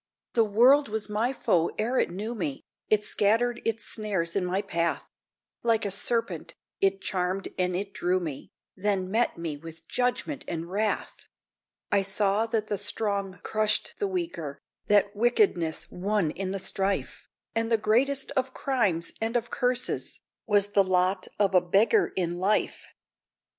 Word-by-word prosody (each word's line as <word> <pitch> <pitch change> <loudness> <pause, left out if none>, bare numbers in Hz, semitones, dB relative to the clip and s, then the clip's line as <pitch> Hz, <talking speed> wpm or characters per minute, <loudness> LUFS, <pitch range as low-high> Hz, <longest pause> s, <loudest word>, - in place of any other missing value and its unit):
The 230 - +4
World 245 +6 +5
was 215 0 -3
my 220 +4 +1
foe 170 -10 +1
ere 240 +4 +1
it - - +2
knew 205 +7 -4
me; 170 - -4 0.3
It 210 -1 +3
scattered 230 +5 +1
its 225 -1 -2
snares 195 -6 -2
in 195 - +1
my 185 +3 -1
path: 170 -3 -1 0.6
Like 225 -2 +2
a 200 - -1
serpent, 195 -5 -1 0.2
it 195 0 +2
charmed 185 0 -1
and 180 -1 +1
it 195 +2 -3
drew 180 +1 +1
me, 155 -6 -6 0.3
Then 190 -1 -1
met 230 -2 +1
me 165 -3 -4
with 165 +1 -11
judgment 250 +3 -1
and 165 -1 -4
wrath! 210 +1 -2 0.6
I 200 - +4
saw 200 +2 +1
that 225 -2 0
the 205 -2 -2
strong 200 -4 -1
crushed 215 0 +1
the 405 - +1
weaker, 330 - -4 0.3
That 205 0 +3
wickedness 225 - +2
won 195 -3 0
in 190 +3 -4
the 195 - -2
strife, 195 +1 -2 0.3
And 225 0 -1
the 225 - +5
greatest 260 +6 +1
of 260 0 -1
crimes 205 -11 0
and 225 +2 -1
of 235 0 -4
curses 250 -1 -1 0.3
Was 205 -1 +3
the 200 -1 +4
lot 185 0 +1
of 200 -2 +2
a 180 - +6
beggar 210 - +3
in 175 -1 -1
life! 200 +3 0
205 Hz, 160 wpm, -27 LUFS, 185-225 Hz, 0.6 s, a